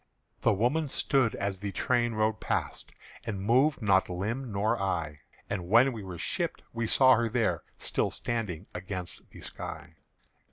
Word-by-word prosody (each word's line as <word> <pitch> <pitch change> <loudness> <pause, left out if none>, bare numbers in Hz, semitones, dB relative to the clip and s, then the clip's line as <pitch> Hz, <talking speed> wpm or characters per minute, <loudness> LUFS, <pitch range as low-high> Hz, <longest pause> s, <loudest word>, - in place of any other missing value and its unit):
The - - +3
woman 125 +10 +1
stood 135 -3 +2
as 100 -1 -2
the 100 0 -3
train 120 +1 +1
rode 110 0 +1
past, - - -3 0.3
And 105 -4 -4
moved 125 +6 +3
nor 95 -2 +5
limb 110 +8 -3
nor 100 +1 0
eye; 85 -6 -2 0.3
And 90 -3 -4
when 120 +5 +6
we 110 - -6
were 95 -3 -7
shipped, - - -2
we 115 -1 -1
saw 130 +3 +6
her 120 -1 +2
there 115 0 +1 0.2
Still - - 0
standing 105 -7 -3
against 90 0 -5
the - - -13
sky. - - -7
110 Hz, 160 wpm, -29 LUFS, 95-120 Hz, 0.3 s, when